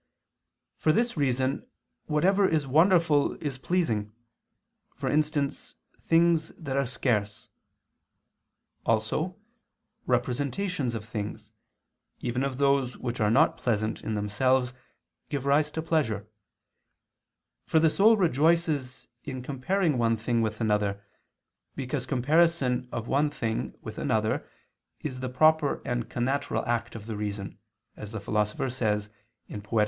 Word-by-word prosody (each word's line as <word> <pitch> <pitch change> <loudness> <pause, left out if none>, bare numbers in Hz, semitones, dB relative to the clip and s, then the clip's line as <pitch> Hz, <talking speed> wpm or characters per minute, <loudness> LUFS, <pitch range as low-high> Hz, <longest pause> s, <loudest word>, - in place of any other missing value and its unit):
For 155 - +3
this 235 +8 +1
reason 135 - 0 0.4
whatever 190 +6 +3
is 155 -3 +1
wonderful 160 +1 +4
is 140 -4 -5
pleasing, 115 - 0 0.8
for - - -4
instance 150 -2 0 0.2
things 165 -1 +3
that 140 -5 -4
are 140 -1 +1
scarce. 105 -4 -1 1.3
Also, 115 +11 0 0.7
representations 135 +3 -1
of 110 -2 -5
things, 110 -1 -6 0.7
even 125 +1 -1
of 135 -2 -2
those 140 -2 +2
which 120 -1 -4
are 105 - +3
not 135 +9 +4
pleasant 110 -2 -1
in 110 - -2
themselves, 125 +5 +1 0.6
give 140 -2 -3
rise 145 +2 +3
to 160 +1 -4
pleasure; 110 - 0 1.4
for 160 - +4
the 160 - +5
soul 215 +7 +5
rejoices 160 -5 +1 0.2
in 130 -2 -6
comparing 145 +3 0
one 115 -1 +2
thing 115 +1 0
with 110 -1 -2
another, 105 -2 0 0.7
because 130 -1 -3
comparison 135 -2 +2
of 115 0 -4
one 145 +3 +2
thing 115 -6 -3
with 110 -1 -7
another 110 -4 0 0.5
is 130 -4 -4
the 130 0 -3
proper 155 +2 +3
and 120 -1 -2
connatural 135 +4 -1
act 120 -1 -1
of 110 -2 -8
the 110 -1 -5
reason, 105 -1 -5 0.4
as 105 -1 -8
the 110 - -4
Philosopher 105 +4 -1
says 105 -4 -1 0.5
(Poet. 110 +2 0
130 Hz, 125 wpm, -27 LUFS, 110-155 Hz, 1.4 s, the